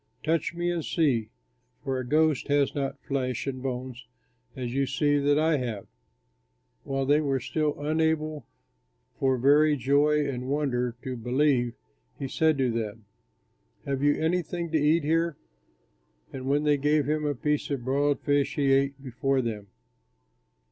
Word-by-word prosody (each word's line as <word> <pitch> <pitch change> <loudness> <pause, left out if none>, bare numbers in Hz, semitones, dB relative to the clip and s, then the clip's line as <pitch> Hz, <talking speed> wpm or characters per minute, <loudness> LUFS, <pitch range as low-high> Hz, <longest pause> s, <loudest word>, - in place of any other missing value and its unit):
Touch 165 +1 0
me 175 0 -1
and 170 -2 -2
see, 125 -11 +1 0.5
for 135 -2 -2
a - - -3
ghost 155 +1 +2
has 145 -1 +2
not 140 -1 -3
flesh 130 -5 -2
and 130 -2 -4
bones 130 -1 -5 0.5
as 125 -2 -4
you 135 0 +1
see 145 +2 +1
that 145 +1 +2
I 155 0 +3
have." 120 -6 -4 1.0
While 135 0 -2
they 145 +3 +3
were 135 -3 0
still 150 +3 -2
unable 155 -1 -1 0.7
for 130 -1 +2
very 145 +4 +4
joy 145 +3 +2
and 125 -2 -4
wonder 125 -5 -1
to 130 -2 -4
believe, 125 0 +1 0.4
he 135 - -4
said 155 +2 +2
to 130 -3 +1
them, 110 -1 -4 0.8
"Have 135 -1 -2
you 145 0 +3
anything 170 0 -1
to 160 - +2
eat 155 +2 +3
here?" 165 +1 +1 1.0
And 130 0 -6
when 145 +2 +2
they 150 -1 +3
gave 145 +1 +2
him 155 0 0
a 145 -1 0
piece 150 +3 -1
of 135 -4 -3
broiled 140 +2 +1
fish, 145 -1 +1
he 140 -2 +2
ate 135 0 +1
before 130 +1 0
them. 105 -3 -4
140 Hz, 155 wpm, -27 LUFS, 130-150 Hz, 1.0 s, very